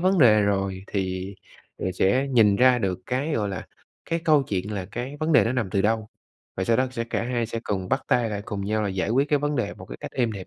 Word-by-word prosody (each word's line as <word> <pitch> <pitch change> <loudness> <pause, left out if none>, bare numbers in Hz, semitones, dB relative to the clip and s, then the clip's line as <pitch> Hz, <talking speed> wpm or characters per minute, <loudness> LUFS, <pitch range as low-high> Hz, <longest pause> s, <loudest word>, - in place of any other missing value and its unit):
vấn 185 +2 +3
đề 110 -7 +6
rồi 95 -1 -1
thì 95 0 -3 0.4
rồi 95 - -2
sẽ 115 +10 +2
nhìn 110 -6 +4
ra 125 +2 +5
được 95 -4 -2
cái, 135 +5 -1
gọi 105 -2 0
là, 95 -3 -5 0.4
cái 165 - +1
câu 150 -3 +5
chuyện 100 -4 -3
là 95 - -3
cái 125 +8 -6
vấn 155 +1 +1
đề 150 - +6
nó 115 - 0
nằm 120 -7 -1
từ 95 +1 +1
đâu, 110 +1 0 0.5
và 95 - -1
sau 115 +3 +3
đó 130 +2 +2
sẽ 115 -2 -3
cả 115 - -2
hai 120 -2 -1
sẽ 115 0 -4
cùng 95 -3 -2
bắt - - 0
tay 120 -2 +2
lại 100 -1 -3
cùng 100 -2 -4
nhau 110 +2 0
là 105 - 0
giải 95 +1 -2
quyết 135 +5 +2
cái 145 - +3
vấn 145 +1 -1
đề 125 - -1
một - - -11
cái - - -8
cách - - -7
êm 120 -3 0
đẹp 95 -3 -7
110 Hz, 270 wpm, -25 LUFS, 100-130 Hz, 0.5 s, đề